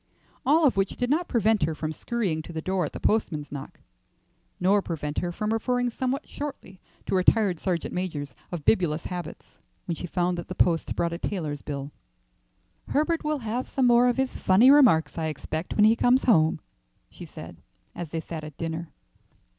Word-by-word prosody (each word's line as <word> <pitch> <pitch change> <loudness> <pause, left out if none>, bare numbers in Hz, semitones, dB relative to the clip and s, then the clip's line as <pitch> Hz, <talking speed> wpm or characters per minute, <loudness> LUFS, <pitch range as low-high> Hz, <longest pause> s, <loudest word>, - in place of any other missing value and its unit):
All 310 +3 +5
of 260 - +3
which 195 0 0
did 245 +1 -1
not 335 +4 +1
prevent 220 -3 +2
her 155 +1 0
from 155 0 -3
scurrying 190 -4 -2
to 155 - -10
the 160 - -4
door 185 +1 -1
at - - -5
the - - -6
postman's 160 -9 0
knock, 140 -2 -8 0.8
nor 195 +3 +3
prevent 150 -5 -3
her 175 - -2
from 210 +5 -2
referring 245 +2 0
somewhat 260 +3 -2
shortly 270 -10 -7 0.2
to - - -3
retired 185 -1 +3
sergeant 175 -4 -2
majors 150 -7 -4 0.2
of 170 -5 -5
bibulous 170 -6 +2
habits 180 -1 -7 0.3
when 170 - -2
she 175 - -6
found 175 0 0
that 170 - -7
the 185 - -6
post 170 -3 +1
brought 170 0 0
a 170 - -5
tailor's 155 -9 -3
bill. 140 -1 -5 1.0
"Herbert 320 +3 0
will 305 0 0
have 240 +4 -2
some 265 - 0
more 240 0 +5
of 245 - +1
his 265 0 -1
funny 215 +8 +5
remarks, 235 - +5
I 160 - -1
expect, 155 +2 -4
when 210 - +5
he 220 +1 +5
comes 245 +2 +3
home," 160 - +3 0.5
she - - -10
said, - - -10 0.4
as 175 -3 -6
they 165 +1 -3
sat 160 -1 -7
at 155 -2 -9
dinner. 165 0 -4
180 Hz, 190 wpm, -26 LUFS, 160-235 Hz, 1.0 s, All